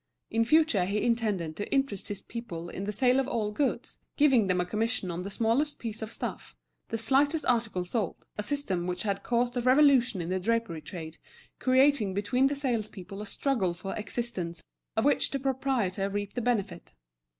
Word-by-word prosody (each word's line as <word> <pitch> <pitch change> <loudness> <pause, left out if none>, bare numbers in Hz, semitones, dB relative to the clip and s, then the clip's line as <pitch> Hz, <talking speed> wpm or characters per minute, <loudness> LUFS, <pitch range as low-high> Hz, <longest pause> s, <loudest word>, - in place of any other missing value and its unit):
In 230 0 +2
future 305 - +4
he 200 +3 -1
intended 210 -9 0
to 205 - -5
interest 270 -8 0
his 205 - -5
people 175 -8 -6
in 195 - -5
the 210 - -1
sale 250 +5 +3
of 265 - 0
all 220 -6 -1
goods, 275 +5 -2 0.2
giving 265 -8 +5
them 185 -1 +2
a 180 - +1
commission 215 0 -1
on 170 +1 -4
the 195 - -5
smallest 235 +8 +1
piece 225 -2 -5
of 220 0 -5
stuff, - - -5 0.3
the 225 - -1
slightest 285 +6 +2
article 225 -7 +1
sold: 200 0 -1 0.2
a - - -2
system 205 -9 -1
which 180 0 -2
had 200 -2 -1
caused 240 +2 0
a - - +1
revolution 255 -4 +5
in 170 0 -3
the 185 0 0
drapery 225 -5 -1
trade, 160 0 -8 0.4
creating 260 -6 +3
between 230 +7 +2
the 285 - -1
salespeople 215 -7 -3
a 210 - -6
struggle 200 -9 0
for 195 +3 -5
existence 200 -7 -3 0.3
of 220 - +2
which 290 - +3
the 275 - -2
proprietor 255 -8 0
reaped 205 0 -3
the 245 - -2
benefit. 205 -7 -2
220 Hz, 185 wpm, -29 LUFS, 190-255 Hz, 0.4 s, giving